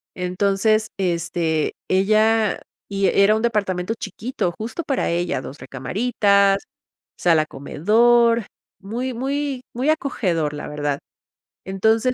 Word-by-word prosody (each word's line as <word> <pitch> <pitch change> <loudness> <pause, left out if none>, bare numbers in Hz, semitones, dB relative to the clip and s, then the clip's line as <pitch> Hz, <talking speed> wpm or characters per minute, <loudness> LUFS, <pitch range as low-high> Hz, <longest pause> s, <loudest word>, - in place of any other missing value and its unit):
Entonces, 200 +4 +1
este, 170 -3 -1 0.2
ella 215 +3 +3 0.3
y 195 -1 0
era 200 +2 +4
un 220 - -1
departamento 200 -3 0
chiquito 215 -2 -3
justo 230 +10 -4
para 275 - -1
ella. 175 -4 -1
Dos 135 +2 -9
recamaritas, 200 - +1 0.5
sala 165 -3 +3
comedor, 230 - +3 0.3
muy, 240 +6 -4
muy, 270 +1 -2
muy 260 +5 0
acogedor, 180 - 0
la 150 - -6
verdad. 145 -1 -2 0.7
Entonces, 220 +6 +1
200 Hz, 110 wpm, -21 LUFS, 175-230 Hz, 0.7 s, era